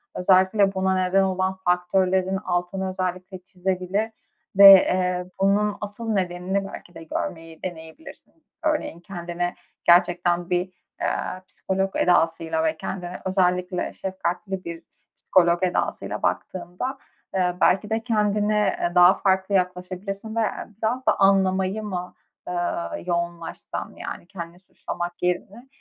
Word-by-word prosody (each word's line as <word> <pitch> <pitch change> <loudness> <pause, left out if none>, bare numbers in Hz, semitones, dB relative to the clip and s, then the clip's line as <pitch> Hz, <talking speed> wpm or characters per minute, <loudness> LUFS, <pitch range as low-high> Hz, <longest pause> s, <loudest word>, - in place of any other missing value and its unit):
Özellikle 190 +2 +4
buna 190 0 +1
neden 185 +1 +3
olan 190 0 0
faktörlerin 185 +1 +2
altını 185 0 -2
özellikle 185 0 -4
çizebilir 185 +4 -2 0.5
ve, 200 0 +12
eee, 180 -1 +3 0.2
bunun 205 +1 +2
asıl 210 +3 -6
nedenini 190 0 -1
belki 175 - -11
de 165 - -9
görmeyi 165 0 -5
deneyebilirsin. 160 - -9 0.3
Örneğin; 305 - -1
kendine 175 -1 -4 0.3
gerçekten 175 0 +3
bir, 180 0 +1 0.4
eee, 185 - -2
psikolog 190 0 -2
edasıyla 165 -2 +2
ve 160 0 0
kendine 180 0 -6
özellikle 180 -1 0
şefkatli 190 0 -4
bir 170 0 -7 0.3
psikolog 175 -1 +3
edasıyla 180 -1 -1
baktığında, 180 +8 -3 0.4
eee, 180 -1 +1
belki 195 +3 +3
de 220 0 -1
kendine, 210 -2 +1
eee, 175 - 0
daha 180 +1 +8
farklı 190 0 +1
yaklaşabilirsin 185 +4 -3
veya 225 -3 -1
biraz 250 +4 0
da - - +2
anlamayı 195 +1 +3
mı, 180 -3 -5 0.4
ııı, 85 - -2
yoğunlaşsan, 170 -1 -4
yani, - - -7
kendini 175 -2 -8
suçlamak 175 -1 -6
yerine? 195 +7 -2
185 Hz, 120 wpm, -24 LUFS, 175-195 Hz, 0.5 s, ve